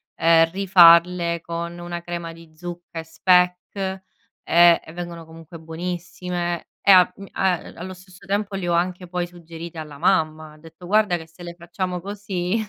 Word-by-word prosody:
ehm, 165 0 +4
rifarle 175 -2 +5
con 170 +1 -5
una 175 0 -6
crema 170 -1 -6
di 165 -1 -16
zucca 175 0 -9
e - - -5
speck, 180 +3 +2
ehm, 190 -1 -3 0.8
e - - -12
vengono 170 -1 -7
comunque 165 +1 -13
buonissime 175 +1 -5
e 200 - +5
a 180 -1 +6
m 195 - -10
a 190 -1 +1 0.2
allo 185 +2 -7
stesso 185 +1 -16
tempo 200 +1 -2
le 190 -2 -4
ho 170 - +1
anche 180 +1 -1
poi 175 0 -3
suggerite 170 -1 -10
alla 150 -3 -8
mamma, 155 -4 0
ho - - -17
detto 165 +3 -14
guarda 210 -2 +3
che 160 -2 -7
se 165 +2 -15
le 170 0 -7
facciamo 175 +1 -5
così 195 -1 -3
175 Hz, 170 wpm, -22 LUFS, 165-180 Hz, 0.8 s, a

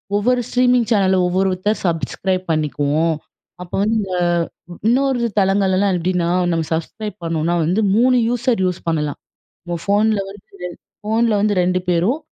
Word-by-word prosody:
ஒவ்வொரு 245 +4 +2
ஸ்ட்ரீமிங் 250 -2 +2
சேனல 190 -3 +3
ஒவ்வொருத்தர் 190 +3 0
சப்ஸ்கிரைப் 185 +3 -1
பண்ணிக்குவோம். 155 +1 0 0.5
அப்ப 180 - -9
வந்து 220 +2 +1 0.2
அ - - 0 0.5
இந்த 175 - -9
இன்னொரு 265 +1 +2 0.2
தளங்கள்லலாம் 195 0 +2
எப்டின்னா 175 0 0 0.2
நம்ம 165 -1 0
சப்ஸ்க்ரைப் 210 +6 -4
பண்ணோம்னா 165 0 -1
வந்து 185 +7 +1
3 250 +3 +4
யூசர் 245 -2 0
யூஸ் 180 -1 -1
பண்ணலாம். 150 -3 -1 0.4
நம்ம 175 -1 -4
ஃபோன்ல 210 +1 +2
வந்து 195 -1 -12 0.6
ஃபோன்ல 225 +2 +1
வந்து 210 0 +2
2 185 +1 +1
பேரும் 180 - +2
190 Hz, 135 wpm, -19 LUFS, 170-220 Hz, 0.6 s, 3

